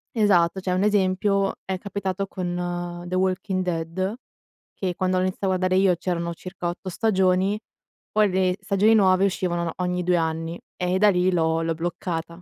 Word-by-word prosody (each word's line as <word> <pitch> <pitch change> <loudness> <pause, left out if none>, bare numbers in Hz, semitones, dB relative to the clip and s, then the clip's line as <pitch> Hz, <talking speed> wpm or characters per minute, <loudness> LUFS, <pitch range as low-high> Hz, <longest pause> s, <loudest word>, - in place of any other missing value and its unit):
Esatto, 190 -4 +3
cioè 185 - -2
un 185 +2 +1
esempio 195 -1 +2
è 190 -1 -3
capitato 195 0 -3
con 175 -1 -4
The 185 - -2
Walking 185 0 0
Dead, 180 +4 -2 0.6
che 185 -2 -3
quando 185 0 0
l'ho 185 - +2
iniziato 185 +1 -2
a - - +1
guardare 185 0 +1
io, 185 -2 +4
c'erano 170 -1 -2
circa 180 0 -5
8 175 +2 -6
stagioni, 190 -1 +2 0.5
poi 215 -1 +3
le 185 0 +1
stagioni 210 +2 +3
nuove 190 -2 +4
uscivano 175 -3 -1
ogni 180 0 -1
2 180 0 +2
anni 165 +1 -2 0.2
e 180 0 0
da 210 +2 +5
lì 180 0 +2
l'ho 165 -1 +1
l'ho 165 0 0
bloccata. 170 0 -4
185 Hz, 170 wpm, -24 LUFS, 175-190 Hz, 0.6 s, da